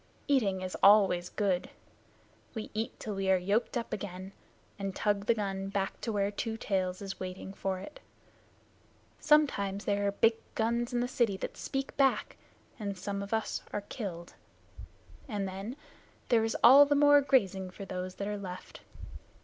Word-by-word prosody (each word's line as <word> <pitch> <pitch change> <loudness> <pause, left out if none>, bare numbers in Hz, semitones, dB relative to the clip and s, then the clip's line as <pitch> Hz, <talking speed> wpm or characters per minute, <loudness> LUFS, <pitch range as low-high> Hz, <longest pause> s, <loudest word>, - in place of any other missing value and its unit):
Eating 210 -10 +2
is 185 0 -4
always 195 -4 +5
good. 195 -4 -1 0.9
We 220 - -5
eat 220 +1 -3
till 215 - -4
we 195 -1 -1
are 190 - +5
yoked 200 +7 0
up 235 - -4
again 190 -2 -6 0.5
and 195 -1 -3
tug 205 -1 0
the 235 - +4
gun 195 -2 -3
back 195 -1 -3
to 230 - -2
where 200 -1 0
Two 225 +2 -3
Tails 185 -3 -2
is 195 -1 -6
waiting 185 +1 -6
for 195 -1 -2
it. 195 - -10 1.2
Sometimes 205 -10 +2
there 205 0 +1
are - - +2
big 225 +3 +4 0.2
guns 235 +2 0
in 240 -1 0
the 245 - 0
city 235 -6 +1
that - - -5
speak 270 0 -4
back, 270 -1 +2 0.4
and 200 -2 -4
some 200 +2 -4
of 200 - -7
us 220 -1 -1
are 205 - -2
killed, 190 -5 -7 0.9
and 205 -5 -2
then 195 +6 -6 0.5
there 230 -2 +4
is 225 - -1
all 275 +4 +9
the 290 - +2
more 290 0 +6
grazing 195 -9 +1
for 195 +2 -9
those 185 -1 -5
that 200 - -4
are 205 0 -3
left. 185 -2 -8
200 Hz, 170 wpm, -31 LUFS, 190-230 Hz, 1.2 s, all